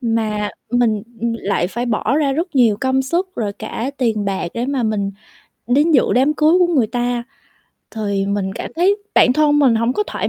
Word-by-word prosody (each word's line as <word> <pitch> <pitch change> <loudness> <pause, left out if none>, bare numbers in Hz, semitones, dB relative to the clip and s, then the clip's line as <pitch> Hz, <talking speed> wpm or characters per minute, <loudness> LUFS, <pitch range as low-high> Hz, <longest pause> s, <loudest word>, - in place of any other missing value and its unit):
mà 220 -3 -1 0.2
mình 230 -4 +1 0.4
lại 195 -4 -1
phải 240 +6 -4
bỏ 235 +3 0
ra 290 -3 +1
rất 330 +5 -3
nhiều 235 -6 +4
công 265 0 +1
sức 340 +8 -1
rồi 210 -3 -2
cả 235 +5 -5
tiền 225 -5 0
bạc 195 -3 -2
để 235 +2 -2
mà 275 -2 -1
mình 210 -3 -1 0.6
đến 285 +7 +3
dự 285 -5 +5
đám 270 +5 +3
cưới 315 +4 +4
của 360 - +4
người 250 -7 +3
ta. 245 +1 -2 0.7
Thì 200 -3 -2
mình 200 -1 -2
cảm - - -6
thấy 375 +4 +3 0.2
bản 250 - +5
thân 295 +1 +3
mình 265 -5 +4
hổng 230 +2 +1
có 420 - 0
thoải - - -3
245 Hz, 200 wpm, -18 LUFS, 215-280 Hz, 0.7 s, dự